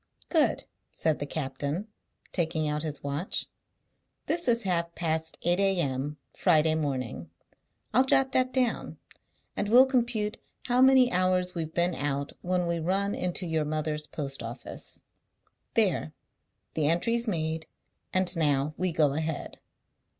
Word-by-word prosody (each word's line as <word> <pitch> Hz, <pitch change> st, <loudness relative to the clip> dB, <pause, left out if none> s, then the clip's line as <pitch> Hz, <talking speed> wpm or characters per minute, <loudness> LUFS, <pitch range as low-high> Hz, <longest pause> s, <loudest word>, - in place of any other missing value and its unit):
"Good," 320 Hz, -4 st, +2 dB, 0.3 s
said 160 Hz, -2 st, 0 dB
the 145 Hz, -, -3 dB
captain, 145 Hz, +6 st, -3 dB, 0.4 s
taking 160 Hz, -3 st, 0 dB
out 150 Hz, 0 st, -1 dB
his 150 Hz, -2 st, -4 dB
watch. 145 Hz, +6 st, -1 dB, 0.8 s
"This 340 Hz, -1 st, 0 dB
is 235 Hz, -1 st, +3 dB
half 170 Hz, -3 st, -1 dB
past 160 Hz, -1 st, -1 dB
eight 175 Hz, +2 st, +2 dB
a.m., 150 Hz, -7 st, 0 dB, 0.2 s
Friday 160 Hz, -3 st, +3 dB
morning. 130 Hz, -, -3 dB, 0.6 s
I'll 255 Hz, +4 st, +6 dB
jot 265 Hz, 0 st, +3 dB
that 255 Hz, 0 st, +2 dB
down, 255 Hz, -3 st, 0 dB, 0.6 s
and 205 Hz, -, -1 dB
we'll 250 Hz, +4 st, +8 dB
compute 235 Hz, -4 st, 0 dB, 0.2 s
how 250 Hz, 0 st, +2 dB
many 260 Hz, -1 st, +6 dB
hours 185 Hz, -1 st, +1 dB
we've 160 Hz, -2 st, -4 dB
been 175 Hz, +1 st, +2 dB
out 140 Hz, -2 st, -2 dB
when 180 Hz, 0 st, 0 dB
we 170 Hz, 0 st, -1 dB
run 195 Hz, +5 st, +1 dB
into 180 Hz, +1 st, -2 dB
your 160 Hz, -2 st, 0 dB
mother's 150 Hz, 0 st, -2 dB
post 140 Hz, -3 st, -4 dB
office. 115 Hz, +2 st, -7 dB, 0.7 s
There! -, -, +2 dB, 0.6 s
The 155 Hz, -2 st, +1 dB
entry's 230 Hz, +9 st, +2 dB
made, 160 Hz, -4 st, -1 dB, 0.4 s
and 185 Hz, -1 st, +2 dB
now 145 Hz, -2 st, +1 dB
we 185 Hz, 0 st, 0 dB
go 150 Hz, -4 st, +3 dB
ahead." 160 Hz, 0 st, -3 dB
170 Hz, 135 wpm, -28 LUFS, 150-200 Hz, 0.8 s, we'll